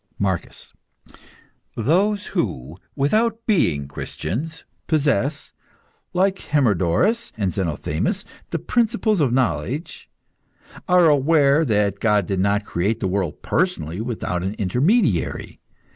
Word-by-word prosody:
MARCUS. 95 -3 -3 1.0
Those 200 - +1
who, 80 - -3 0.2
without 225 +11 +1
being 80 - +1
Christians, 120 - -5 0.2
possess, 145 -2 0 0.6
like 190 +1 +1
Hermodorus 135 - +1
and 100 -4 -1
Zenothemis, 80 -4 -2 0.2
the - - -1
principles 225 -4 +1
of 135 -5 +2
knowledge, 130 +4 -2 0.8
are 180 -2 +5
aware 145 0 +4
that 105 -4 +1
God 105 -4 +2
did 95 0 -2
not 100 +2 +1
create 100 +6 -1
the 95 - -1
world 95 -4 -2
personally 80 +6 -1
without 110 -6 -3
an 95 +3 -3
intermediary. 125 - 0
125 Hz, 105 wpm, -22 LUFS, -, 1.0 s, are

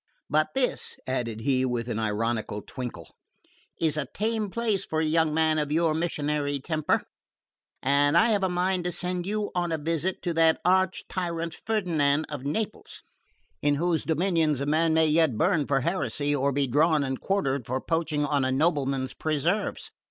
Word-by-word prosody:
But 155 - +1
this," 260 -2 -1
added 115 -4 -2
he 130 0 +1
with 120 -2 -1
an 115 -2 -2
ironical 110 -1 -2
twinkle, 125 -2 -7 0.6
"is 160 -2 +1
a 150 - -2
tame 215 0 -1
place 220 -2 0
for 155 - -2
a 160 - +1
young 160 0 +2
man 155 0 +2
of 150 -1 -2
your 160 0 +2
missionary 150 -3 -1
temper, 155 +2 0 0.8
and 145 +3 +3
I 230 +4 +5
have 210 -3 +2
a 190 - +1
mind 180 0 0
to 180 - 0
send 180 +1 -3
you 210 0 -2
on 175 -1 -1
a 160 - 0
visit 165 +4 -2
to 175 - -1
that 160 0 +4
arch 185 0 +2
tyrant 170 -3 -3
Ferdinand 160 -9 +1
of 145 -3 -6
Naples, 210 +10 -4 0.6
in 145 0 +2
whose 165 +2 0
dominions 165 -3 +1
a 140 - -2
man 160 +2 +2
may 160 0 +5
yet 155 -6 +3
burn 160 - +2
for 135 -2 +2
heresy 145 -3 -1
or 140 0 +1
be 140 +1 +1
drawn 150 +3 +3
and 130 -1 -3
quartered 140 - -1
for 130 +2 -1
poaching 155 -1 -1
on 145 -2 +1
a 130 - +1
nobleman's 135 -3 0
preserves. 160 +9 -1
155 Hz, 175 wpm, -27 LUFS, 140-175 Hz, 0.8 s, I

